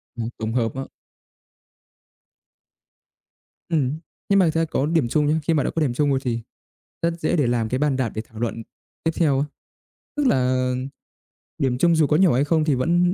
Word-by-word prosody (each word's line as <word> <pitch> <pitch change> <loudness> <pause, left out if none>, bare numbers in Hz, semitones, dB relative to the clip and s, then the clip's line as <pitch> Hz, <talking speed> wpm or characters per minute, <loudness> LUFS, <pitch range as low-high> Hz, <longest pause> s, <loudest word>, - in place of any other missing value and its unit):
Ừm, 115 -1 -3
tổng 110 0 -3
hợp 115 -2 0
á. 135 - -3 2.9
Ừm, 150 -2 0 0.3
nhưng 200 0 +5
mà 185 - +5
thực 160 - +1
ra 165 0 +1
có 145 -3 -1
điểm 160 -6 +1
chung 150 +5 +1
nhá. 155 +2 +2
Khi 165 - +1
mà 150 -3 +2
đã - - -1
có 165 - -2
điểm 135 -5 +1
chung 145 +3 +1
rồi 135 -1 +2
thì 120 -2 -1 0.6
rất 170 0 -1
dễ 155 - 0
để 145 -6 +2
làm 115 -2 0
cái 130 - -1
bàn 145 -2 +1
đạp 125 -4 0
để 110 - -2
thảo 110 - -12
luận 115 -1 -3 0.4
tiếp 165 - +1
theo 145 -6 +2
á. 140 - +1 0.7
Tức 290 -2 +2
là 130 - +2 0.9
điểm 130 -2 +1
chung 170 +4 +4
dù 155 -2 +3
có 150 - +3
nhỏ 180 -6 +5
hay 135 - +3
không 160 0 +2
thì 150 -3 +2
vẫn 175 +7 +2
145 Hz, 205 wpm, -23 LUFS, 125-165 Hz, 2.9 s, nhưng